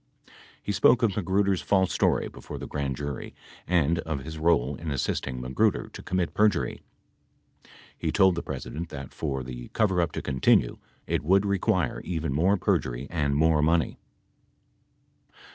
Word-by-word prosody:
He - - -2
spoke 115 +4 +4
of 105 -5 +2
Magruder's 100 -1 +1
false 95 -2 +2
story - - +2
before - - -9
the - - -6
grand 70 -2 -3
jury 70 0 -6 0.3
and 85 -2 +2
of 80 -5 -4
his 80 +1 -7
role 75 -4 +2
in 80 +3 -6
assisting 65 -2 -2
Magruder 65 +1 0
to - - -10
commit 90 -2 -1
perjury. 105 -4 +1 1.1
He - - -2
told 95 -1 +5
the 85 - -3
President 85 +2 -6
that, 70 -2 -8
for 65 -4 -3
the - - -7
coverup 95 -6 +2
to - - -4
continue, 65 -2 +2 0.3
it - - -1
would 95 +5 +3
require 95 - 0
even 80 -5 -2
more 90 +8 +3
perjury 65 -7 0
and 75 -4 0
more 80 0 +3
money. 80 -1 +1
80 Hz, 150 wpm, -27 LUFS, 70-95 Hz, 1.1 s, told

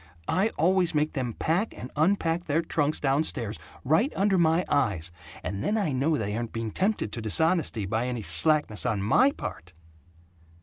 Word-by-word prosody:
I 195 +4 +2
always 175 0 +2
make 150 +1 +1
them 125 -5 -2
pack 175 - -1
and 125 +6 -8
unpack 165 +1 +1
their 160 +3 0
trunks 150 -2 0
down 140 +2 +2
stairs, 115 -8 -3 0.3
right 165 - +2
under 195 0 +2
my 165 +1 +3
eyes, 95 - 0 0.3
and 100 +3 -4
then 215 - 0
I 200 -8 0
know 140 +4 +1
they 105 -2 -3
aren't 115 0 -4
being 115 -1 -3
tempted 190 - -1
to 115 - -5
dishonesty 145 - 0
by 110 +5 -1
any 120 -3 -3
slackness 110 - +3
on 100 -3 -1
MY 260 - +4
part!" 85 +2 -8
145 Hz, 175 wpm, -27 LUFS, 110-170 Hz, 0.3 s, MY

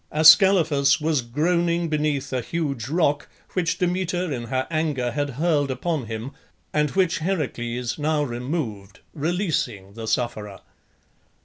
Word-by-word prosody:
Ascalaphus 155 -3 +6
was 155 -2 +1
groaning 170 +7 0
beneath 150 -3 -1
a 130 - 0
huge 140 -4 -3
rock 150 -3 +1 0.2
which 175 -2 0
Demeter 180 -1 -1
in 120 -2 -4
her 130 +2 -1
anger 150 -6 0
had 145 +1 -1
hurled 150 -3 +1
upon 135 0 -2
him, 115 +4 -5 0.4
and 150 0 +2
which 180 0 +1
Heracles 125 -8 -2
now 150 0 +1
removed, 120 - -4
releasing 150 - -2
the 115 0 -7
sufferer. 110 -3 -2
150 Hz, 125 wpm, -24 LUFS, 125-165 Hz, 0.4 s, Ascalaphus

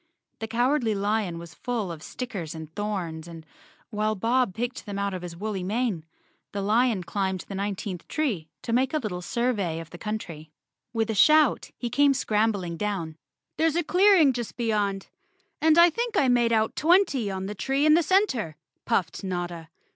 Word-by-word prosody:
The 225 - -4
Cowardly 240 0 +1
Lion 200 -3 -1
was 170 0 -9
full 225 -3 -3
of 160 -2 -8
stickers 190 -11 -6
and 160 0 -9
thorns 180 -6 -4
and, 165 -2 -10 0.5
while 215 0 0
Bob 230 0 +1
picked 240 +1 -4
them 200 -1 -4
out 200 0 -1
of 185 - -4
his 175 -1 -7
woolly 205 0 -3
mane, 200 -3 -1 0.5
the 200 - -2
clown 220 -1 +2
climbed 190 0 -2
the - - -9
nineteenth 195 -2 -4
tree 225 - -2
to 230 - -2
make 260 +4 +2
a - - +4
little 210 -10 -4
survey 200 -6 -1
of 165 0 -10
the 175 - -10
country. 175 -8 -5 0.4
With 225 -1 0
a - - -1
shout 305 +6 +4
he 240 -2 -4
came 285 -1 +4
scrambling 210 -8 0
down. 190 -6 -3 0.4
"There's 325 -1 +2
a 345 - +1
clearing 360 -5 +5
just 240 -4 -5
beyond, 205 -4 -1 0.5
and 315 +1 +5
I 340 0 +8
think 465 +3 -2
I 275 - +4
made 240 -1 +3
out 220 -1 +1
twenty 320 - +3
on 190 -1 -4
the 205 - -4
tree 270 +7 0
in 305 - +6
the 335 - +5
center," 295 - +1 0.3
puffed 195 -6 -1
Notta. 175 -3 -4
215 Hz, 180 wpm, -26 LUFS, 185-255 Hz, 0.5 s, I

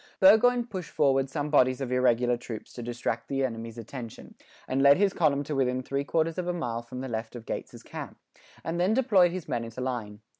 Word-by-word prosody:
"] - - -34
Burgoyne 235 +5 +6
pushed 190 -7 -6
forward 135 -2 +2
some 145 +1 -3
bodies 130 -3 +4
of 130 -2 -4
irregular 125 -1 +3
troops 120 -2 -8
to 120 - -7
distract 115 -1 -3
the 135 0 0
enemy's 115 -2 -6
attention; 115 0 -8 0.3
and 135 +1 0
led 140 +1 +7
his 195 0 +2
column 145 -4 +2
to 150 - -4
within 130 -1 0
three 140 +2 -2
quarters 165 +3 0
of 180 - -3
a 175 - 0
mile 120 -9 -3
from 125 +2 -8
the 135 - -4
left 110 0 -4
of 115 -2 -8
Gates's - - -6
camp, - - -8 0.5
and 165 +1 -3
then 190 +5 +2
deployed 205 -9 +4
his 180 -2 -6
men 120 - -2
into 115 +2 -8
line. 115 -5 -4
135 Hz, 220 wpm, -28 LUFS, 120-165 Hz, 0.5 s, led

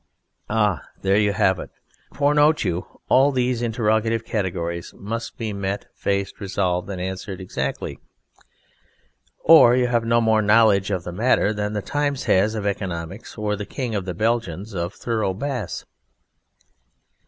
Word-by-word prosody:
_ - - -45 0.5
Ah! 105 -5 +1 0.2
There 95 0 +3
you 105 -1 +3
have 95 -1 +2
it. - - -7 0.4
For 145 +1 +2
note 150 +1 +4
you, 90 +1 -4
all 135 +2 +5
these 125 -2 0
interrogative 115 -1 0
categories 85 -4 -3
must 115 +4 -5
be 110 -3 -3
met, 100 0 -3
faced, 100 0 -2
resolved 95 -2 -1
and 95 -2 -4
answered 95 +1 -5
exactly 95 - -4 1.4
or 155 -7 +8
you 125 -1 +3
have 120 -1 +1
no 115 +1 +3
more 110 -1 +3
knowledge 105 -2 +4
of 95 -4 -1
the 90 - -5
matter 105 +1 +2
than 105 0 -2
the 105 -2 -2
Times 145 -2 -1
has 105 +4 +2
of 105 -2 -3
economics 95 0 -4
or 105 -1 -1
the 105 0 -6
King 125 -5 -4
of 100 -3 -2
the 90 -2 -4
Belgians 110 -2 -1
of 85 +2 -3
thorough 110 -5 -1
Bass. 125 -4 -4
105 Hz, 155 wpm, -23 LUFS, 95-115 Hz, 1.4 s, or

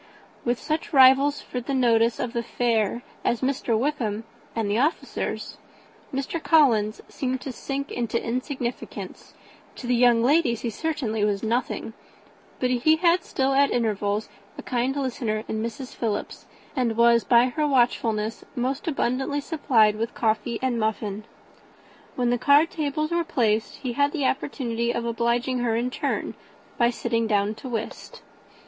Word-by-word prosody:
With 240 0 0
such 315 +1 -3
rivals 270 +2 +6
for 250 - -5
the 270 +3 -3
notice 230 -2 +3
of 245 -1 -3
the 235 - 0
fair 235 -1 0 0.2
as 235 - 0
Mr. 260 -4 0
Wickham 230 -5 -1 0.3
and 225 -2 -1
the 205 +3 +1
officers, 300 +6 -2 0.5
Mr. 275 +5 -3
Collins 235 -11 +3
seemed 260 -1 -3
to 270 - -5
sink 275 +3 -5
into 235 -1 -1
insignificance; 250 0 -5 0.4
to - - -8
the 245 - +1
young 240 -1 +4
ladies 250 -4 +3
he 235 - -2
certainly 250 -7 -2
was 205 0 0
nothing; 230 0 -2 0.7
but 250 0 +1
he 255 +6 +4
had 340 +1 +3
still 270 0 0
at 280 +1 +4
intervals 210 -2 0 0.3
a - - -7
kind 255 +2 -1
listener 235 -6 -2
in 220 - -2
Mrs. 235 +3 -6
Philips, 215 -3 -3 0.3
and 235 -4 0
was, 235 0 +5
by 240 +1 +4
her 300 +4 0
watchfulness, 230 -4 +1
most 265 +6 -2
abundantly 270 -1 0
supplied 235 -9 +2
with 225 +1 -3
coffee 225 +1 0
and 250 -3 0
muffin. 215 -1 -2 0.9
When 245 -1 +1
the 245 - +1
card 295 +5 +5
tables 305 0 -2
were 340 0 +1
placed, 225 -8 0
he 255 -4 -4
had 285 +4 +1
an 290 - -1
opportunity 240 -3 -1
of 235 0 -3
obliging 235 +2 0
her, 235 -2 0
in 235 +2 0
return, 250 - -2 0.5
by 235 -1 +5
sitting 230 -1 -1
down 205 -1 +1
to 255 +4 -9
whist. 225 -2 -6
240 Hz, 155 wpm, -25 LUFS, 225-270 Hz, 0.9 s, rivals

